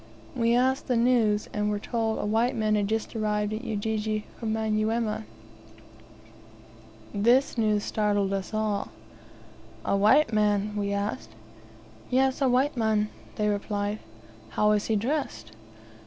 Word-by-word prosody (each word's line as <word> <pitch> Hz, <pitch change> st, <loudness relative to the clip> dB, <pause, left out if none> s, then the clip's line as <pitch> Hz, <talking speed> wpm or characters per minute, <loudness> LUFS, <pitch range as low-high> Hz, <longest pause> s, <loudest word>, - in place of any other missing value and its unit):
We 235 Hz, -1 st, +2 dB
asked 260 Hz, +2 st, +1 dB
the 250 Hz, -, +1 dB
news, 230 Hz, -3 st, +2 dB
and 210 Hz, 0 st, 0 dB
were 210 Hz, -, 0 dB
told 225 Hz, +1 st, -1 dB
a -, -, -2 dB
white 225 Hz, +4 st, +1 dB
man 215 Hz, -2 st, +1 dB
had 205 Hz, -1 st, +1 dB
just 220 Hz, +2 st, -2 dB
arrived 210 Hz, -1 st, 0 dB
at 220 Hz, +3 st, -4 dB
Ujiji 215 Hz, -1 st, -2 dB
from 225 Hz, -2 st, -2 dB
Manyuema. 220 Hz, 0 st, 0 dB, 1.9 s
This 240 Hz, +6 st, +3 dB
news 215 Hz, -3 st, +1 dB
startled 205 Hz, -2 st, 0 dB
us 195 Hz, -2 st, -3 dB
all. 215 Hz, -2 st, -1 dB, 1.0 s
"A -, -, +1 dB
white 215 Hz, +7 st, +4 dB
man?" 210 Hz, -1 st, +1 dB
we 200 Hz, -1 st, -1 dB
asked. 200 Hz, +1 st, -3 dB, 0.8 s
"Yes, 265 Hz, +2 st, +2 dB
a 270 Hz, -, +4 dB
white 265 Hz, +4 st, +2 dB
man," 215 Hz, -2 st, +1 dB, 0.3 s
they 210 Hz, -, 0 dB
replied. 205 Hz, 0 st, -1 dB, 0.5 s
"How 210 Hz, 0 st, +2 dB
is 210 Hz, -1 st, +1 dB
he 220 Hz, -, +1 dB
dressed?" 210 Hz, -, -2 dB
215 Hz, 140 wpm, -27 LUFS, 210-230 Hz, 1.9 s, white